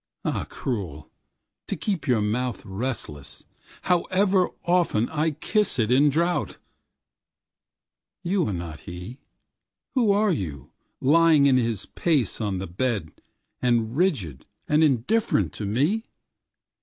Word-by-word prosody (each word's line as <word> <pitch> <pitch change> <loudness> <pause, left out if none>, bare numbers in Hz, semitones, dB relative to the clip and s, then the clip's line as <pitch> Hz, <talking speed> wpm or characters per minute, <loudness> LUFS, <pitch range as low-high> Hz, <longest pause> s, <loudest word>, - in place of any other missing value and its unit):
Ah - - -1
cruel, 95 - -5 0.6
to - - -2
keep 180 +2 -3
your 120 -5 +3
mouthRelentless, 110 - -4 0.4
however 185 +1 +2 0.2
oftenI 155 -2 +1
kiss 210 -3 +1
it 115 -1 +1
in 140 +4 +5
drouth. 170 +5 0 1.7
You 185 0 +1
are - - -1
not 85 -4 -6
he. 90 +9 -8 0.7
Who 240 -6 +3
are 205 0 +3
you, 75 - -4 0.3
lying 155 +1 +5
in 135 -2 +5
his 115 -5 -1
place 140 - 0
on 100 -3 -1
the 95 - -4
bedAnd 95 - -2 0.8
rigid 130 - -1 0.2
and 150 +2 +3
indifferent 135 - +2
to 105 - -5
me? 150 - 0
130 Hz, 110 wpm, -25 LUFS, 105-170 Hz, 1.7 s, in